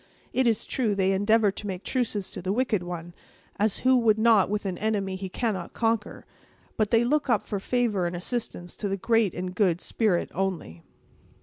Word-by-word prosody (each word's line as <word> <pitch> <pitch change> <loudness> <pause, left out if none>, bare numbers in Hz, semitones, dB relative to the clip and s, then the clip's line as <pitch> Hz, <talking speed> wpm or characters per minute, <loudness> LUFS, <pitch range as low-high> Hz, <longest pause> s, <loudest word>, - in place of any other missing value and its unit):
It 260 -1 +2
is 225 -2 +1
true, 225 -6 0
they 190 -1 +2
endeavor 205 +2 +3
to 205 +1 -7
make 190 0 -5
truces 225 -6 -1
to - - -6
the 185 +2 -2
wicked 225 -3 +1
one—as 175 +4 -5
who 260 0 +6
would 225 -3 +3
not 220 -4 +4
with 210 0 -2
an 185 -2 -3
enemy 200 -3 -1
he 190 0 -5
cannot 190 -4 -3
conquer! 225 -2 -1 0.5
but 215 -2 +1
they 230 0 +4
look 285 +3 +1
up - - +2
for 205 - -3
favor 210 -5 0
and 175 - -4
assistance 175 -2 -4
to 205 - -3
the 195 - -1
Great 225 -1 +2
and 180 +1 -4
Good 180 -3 +2
Spirit 205 -5 0
only." 175 - -3
205 Hz, 190 wpm, -26 LUFS, 185-225 Hz, 0.5 s, who